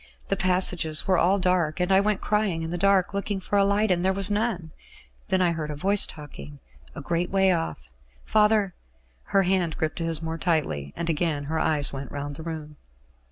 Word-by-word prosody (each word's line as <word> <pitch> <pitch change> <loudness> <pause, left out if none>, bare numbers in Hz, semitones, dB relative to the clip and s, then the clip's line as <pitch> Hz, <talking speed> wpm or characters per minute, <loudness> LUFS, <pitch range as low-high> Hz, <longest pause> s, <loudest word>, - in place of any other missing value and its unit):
The 195 - +1
passages 180 -4 +3
were 185 -2 +2
all 190 +3 +3
dark, 180 -4 0
and 180 +1 0
I 190 - +5
went 210 -1 -1
crying 205 -6 -1
in 165 - -5
the - - -3
dark, 195 0 +2
looking 200 0 -2
for 190 - -4
a - - +4
light, 200 +1 +1
and 175 -1 +1
there 190 - +2
was 195 +1 +2
none. 205 -6 -2 0.6
Then 190 -1 +1
I 175 - +2
heard 160 -2 -4
a 150 - -4
voice 195 +7 +4
talking, 75 - -10 0.4
a - - -7
great 175 +1 -2
way 190 -1 +3
off. 65 - -4 0.3
Father 210 -3 +2 0.3
" - - -38
Her 195 - +2
hand 180 -3 0
gripped 160 +1 -3
his 165 -2 -1
more 165 0 -5
tightly, 140 - -1
and 170 - -4
again 160 -2 -1
her 160 +3 -3
eyes 150 -4 +1
went 135 0 -7
round 145 0 -5
the 160 - -8
room. 155 -2 -7
175 Hz, 205 wpm, -25 LUFS, 155-195 Hz, 0.6 s, I